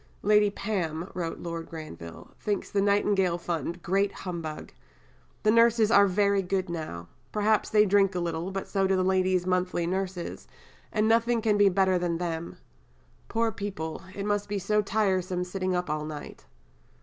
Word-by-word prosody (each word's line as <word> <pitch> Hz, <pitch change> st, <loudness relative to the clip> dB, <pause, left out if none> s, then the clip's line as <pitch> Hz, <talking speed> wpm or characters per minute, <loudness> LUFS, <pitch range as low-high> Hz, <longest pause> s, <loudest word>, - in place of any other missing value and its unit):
"Lady 210 Hz, 0 st, +5 dB
Pam," 185 Hz, -5 st, -3 dB
wrote 170 Hz, -2 st, -3 dB
Lord 170 Hz, -1 st, -6 dB
Granville, 85 Hz, -, -9 dB
"thinks 205 Hz, -2 st, -2 dB
the 200 Hz, -, +2 dB
Nightingale 200 Hz, -3 st, +2 dB
Fund 170 Hz, 0 st, -4 dB
great 195 Hz, +2 st, +1 dB
humbug. 165 Hz, -4 st, -6 dB, 0.7 s
'The 215 Hz, -, +4 dB
nurses 230 Hz, -1 st, +4 dB
are 200 Hz, -2 st, +7 dB
very 200 Hz, +1 st, +2 dB
good 190 Hz, 0 st, -2 dB
now; 155 Hz, -, -5 dB, 0.2 s
perhaps 215 Hz, 0 st, +2 dB
they 210 Hz, -1 st, +5 dB
do 210 Hz, -, -1 dB
drink 195 Hz, -1 st, +3 dB
a -, -, 0 dB
little, 170 Hz, +1 st, -2 dB
but 195 Hz, 0 st, -4 dB
so 195 Hz, -2 st, +1 dB
do 190 Hz, -, +2 dB
the 185 Hz, -, +2 dB
ladies' 185 Hz, -1 st, +2 dB
monthly 180 Hz, -1 st, 0 dB
nurses, 185 Hz, 0 st, -3 dB, 0.4 s
and 215 Hz, 0 st, +1 dB
nothing 230 Hz, +1 st, +3 dB
can 220 Hz, -2 st, +2 dB
be 205 Hz, -1 st, +5 dB
better 190 Hz, -1 st, +2 dB
than 175 Hz, -1 st, -1 dB
them; 170 Hz, -1 st, -4 dB, 0.7 s
poor 230 Hz, 0 st, 0 dB
people, 190 Hz, -6 st, -5 dB
it 200 Hz, -, -4 dB
must 205 Hz, -1 st, -1 dB
be 205 Hz, -, -1 dB
so 210 Hz, +2 st, +1 dB
tiresome 190 Hz, -3 st, 0 dB
sitting 185 Hz, 0 st, -2 dB
up 180 Hz, 0 st, -1 dB
all 150 Hz, 0 st, -2 dB
night.'" 150 Hz, -1 st, -8 dB
190 Hz, 170 wpm, -27 LUFS, 175-205 Hz, 0.7 s, are